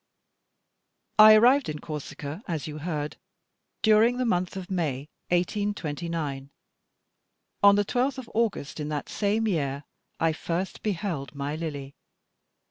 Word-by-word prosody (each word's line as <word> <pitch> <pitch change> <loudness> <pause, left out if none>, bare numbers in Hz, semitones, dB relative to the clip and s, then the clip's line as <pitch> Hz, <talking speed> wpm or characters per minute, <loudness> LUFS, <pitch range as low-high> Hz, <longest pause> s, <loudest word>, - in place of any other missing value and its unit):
I 215 0 +10
arrived 250 - +5
in 150 - -3
Corsica, 150 +2 -6
as 160 -6 -3
you 155 0 -6
heard, 150 -2 -3 0.7
during 220 +3 +5
the 255 - 0
month 185 -4 0
of 190 +1 -7
May, 150 -5 -2 0.2
1829. 170 -7 -2 1.1
On 200 0 +7
the 205 0 +2
12th 255 +5 0
of 260 -3 -7
August 215 -10 -1
in 150 0 -3
that 150 -2 -4
same 215 +2 0
year 140 -7 -1 0.4
I 165 -1 +2
first 170 +4 -3
beheld 175 -9 -3
my 140 +1 -3
Lily. 145 -4 -5
170 Hz, 125 wpm, -27 LUFS, 150-210 Hz, 1.1 s, I